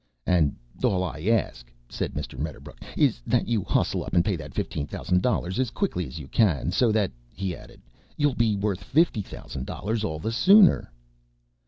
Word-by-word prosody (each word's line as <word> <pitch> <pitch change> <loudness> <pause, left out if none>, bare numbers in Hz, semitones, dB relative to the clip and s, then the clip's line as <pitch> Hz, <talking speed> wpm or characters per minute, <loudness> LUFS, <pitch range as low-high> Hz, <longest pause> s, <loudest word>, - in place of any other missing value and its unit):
"And 85 -6 +2 0.3
all 95 -2 +2
I 85 -4 -5
ask," 60 - 0 0.2
said - - -4
Mr. 75 -3 -5
Medderbrook, 75 0 -6 0.2
"is - - +2
that - - +1
you 110 -4 0
hustle - - 0
up - - -5
and 85 - +4
pay 100 - +1
that 75 -4 -9
fifteen 75 -2 -3
thousand 90 0 0
dollars 95 -5 0
as 130 -3 +1
quick 200 - -2
as 90 -2 -4
you 75 -4 -8
can. 85 - +2
So 115 +4 +3
that," 105 -3 +1 0.2
he 95 -3 -3
added, - - -15 0.4
"you'll 145 -2 +2
be 115 -3 +2
worth 100 -2 -2
fifty 155 -7 +2
thousand 65 -8 -8
dollars 110 +2 -3
all 80 -7 -2
the 95 +9 -3
sooner." 190 - +5
95 Hz, 185 wpm, -26 LUFS, 80-115 Hz, 0.4 s, sooner